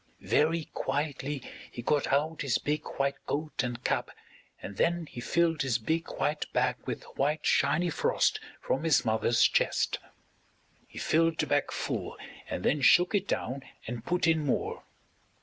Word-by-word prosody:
Very 160 +1 +2
quietly 140 0 -2 0.3
he 120 - -7
got 145 +3 +1
out 155 +3 +1
his 135 -5 +2
big 150 +1 -1 0.2
white 140 0 -1
coat 150 0 -1
and 120 -1 -4
cap - - 0 0.5
and 100 - -8
then 170 0 +1
he 120 - -8
filled 165 +2 +1
his 130 -4 +1
big 160 +9 -1
white 150 +1 -1
bag 125 0 +2
with - - -3
white 150 +3 0
shiny 160 +5 +3
frost - - +1 0.2
from 135 - -1
his 160 -3 +3
mother's 110 +1 +3
chest. - - +2 0.9
He - - -14
filled 165 0 +2
the - - +1
bag - - +1
full - - -3 0.3
and 90 - -3
then 145 +1 +2
shook 180 +8 +6
it 200 -1 +1
down 135 +2 -2 0.2
and 115 -1 -5
put 180 +5 0
in 160 -2 +3
more. 140 - -1
145 Hz, 160 wpm, -29 LUFS, 130-160 Hz, 0.9 s, shook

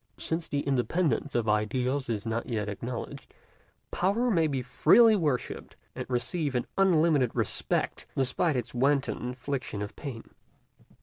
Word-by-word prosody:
Since 165 0 -2
the 145 - -1
independence 140 +1 0
of 115 -2 +1
ideals 125 +5 0
is 110 -2 -2
not 115 +2 -2
yet 110 -3 -2
acknowledged, 115 +4 -6 0.6
Power 225 +7 +1
may 165 -5 +3
be 135 -4 -2
freely 225 - +5
worshiped, 150 -10 -2 0.2
and - - -6
receive 140 +3 -1
an 125 - 0
unlimited 165 -8 +3
respect, - - -1
despite 135 +4 +1
its 125 -3 -3
wanton 135 +2 +1
infliction 125 -3 -4
of 105 - -7
pain. 130 -6 -8
135 Hz, 135 wpm, -28 LUFS, 120-160 Hz, 0.6 s, freely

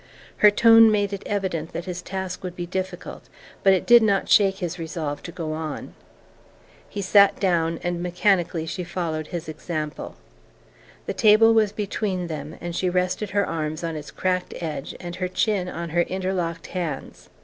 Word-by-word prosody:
Her 210 - +7
tone 225 +1 +7
made 205 -1 +1
it 200 - -4
evident 185 -6 -2
that 170 - -4
his 180 -1 -5
task 190 -1 -5
would 180 -1 -5
be 175 - -4
difficult, 185 +1 -6 0.3
but 195 - +5
it 190 - +2
did 240 0 +8
not 200 -3 +2
shake 195 -2 +5
his 180 -1 -4
resolve 160 -3 -4
to 170 - -8
go 165 -3 -4
on. 155 -1 -5 1.0
He 200 - -4
sat 200 +1 +5
down, 165 -3 +1
and 175 -1 -2
mechanically 175 -2 +1
she 170 +2 -4
followed 170 -3 -3
his 170 -2 -5
example. 155 -1 -5 0.9
The - - -3
table 225 0 +6
was 215 -2 +3
between 200 -3 -2
them 155 -2 -6
and 175 -1 -5
she 185 - 0
rested 180 +3 -1
her 200 0 +1
arms 155 -1 -3
on 165 -1 -3
its 150 -1 -7
cracked 185 -1 -2
edge 155 -4 -5
and 175 -1 -7
her 185 0 -1
chin 185 0 0
on 170 -2 -5
her 175 +2 +3
interlocked 180 -3 -2
hands. 165 -7 -5
180 Hz, 175 wpm, -24 LUFS, 165-195 Hz, 1.0 s, did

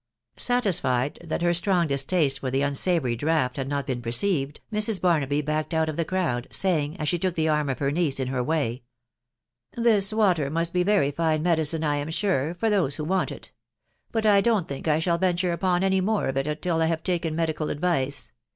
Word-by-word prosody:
Satisfied 160 - +2
that 170 +1 -3
her 175 0 +3
strong 175 0 +2
distaste 140 0 +1
for 130 - -3
the 135 +2 0
unaavonry 140 -2 0
dreamt 145 -1 0
had 135 -1 -3
not 140 -1 -2
been 125 -3 -3
perceived, 135 +4 -1
Mrs. 210 -1 +2
Bamaby 150 -5 +1
backed 155 +1 -2
cms 160 0 +1
of 155 - -4
thai 165 - +1
nieei, 155 -10 -1
saying, 165 -4 +1
as 155 - -3
she 175 +3 0
took 185 0 -1
the 160 -2 +1
arm 150 -2 +1
of 130 - -2
her 140 -1 -1
niece 150 -4 0
in 130 -1 -2
her 130 -1 -1
way* 135 -5 -1 1.0
u 235 - -2
Tail 225 -4 +4 0.2
water 180 -10 +2
must 165 +2 -2
be 180 - +2
a - - 0
very 200 -9 +2
fine 155 0 0
medicine, 160 -2 0
I 145 -1 +1
am 145 +2 -4
sure, 165 -3 0
for 200 +6 -1
rnnssnai 165 -8 0
want 185 +2 0
it; - - -10 0.6
but 225 -1 -1
I 205 -2 +5
don't 215 -6 +1
think 140 +3 -6
I 150 -1 +3
shall 170 +1 0
venture 180 -1 +1
upas 180 0 0
any 190 0 +2
meres? 200 -9 0
it 150 +3 -2
till 165 -2 0
I 160 - +3
have 160 -1 -2
taken 170 -3 -1
medical 160 -2 -1
advice 140 -5 -1
160 Hz, 210 wpm, -25 LUFS, 140-180 Hz, 1.0 s, I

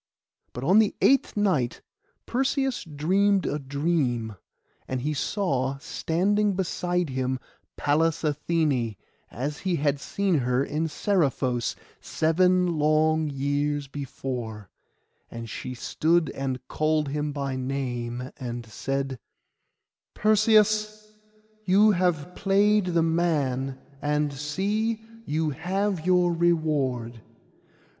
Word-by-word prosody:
But 125 - -6
on 185 +9 +5
the 215 -2 +2
eighth 270 -5 +3
night 170 -13 +1 0.4
Perseus 265 +1 0
dreamed 185 +6 +2
a 150 - -1
dream; 135 -6 -1 0.5
and 130 -1 -2
he 150 +4 -1
saw 135 -5 -1
standing 195 +7 0
beside 180 -3 -1
him 130 0 -1 0.4
Pallas 160 +3 +1
Athené, 150 - 0 0.3
as 145 +6 -4
he 185 -2 0
had 145 -2 0
seen 190 +2 0
her 125 +1 +1
in 155 +3 -1
Seriphos, 140 - 0 0.2
seven 180 +1 +2
long 155 +1 +3
years 145 +1 -1
before; 125 -7 -6 0.6
and 115 0 -7
she 125 +4 -6
stood 160 +6 +1
and 130 -2 -4
called 155 -1 0
him 150 +1 -2
by 140 -2 -3
name, 125 -2 -3
and 120 -2 -5
said— 135 +3 -3 1.0
'Perseus, 215 0 +3 0.5
you 205 +3 +5
have 175 -3 0
played 205 +1 +3
the 170 -2 +2
man, 145 -6 0 0.2
and 150 0 0
see, 200 +10 -1 0.3
you 155 +1 0
have 180 +3 -2
your 180 -1 +4
reward. 145 -9 0
150 Hz, 105 wpm, -26 LUFS, 135-180 Hz, 1.0 s, on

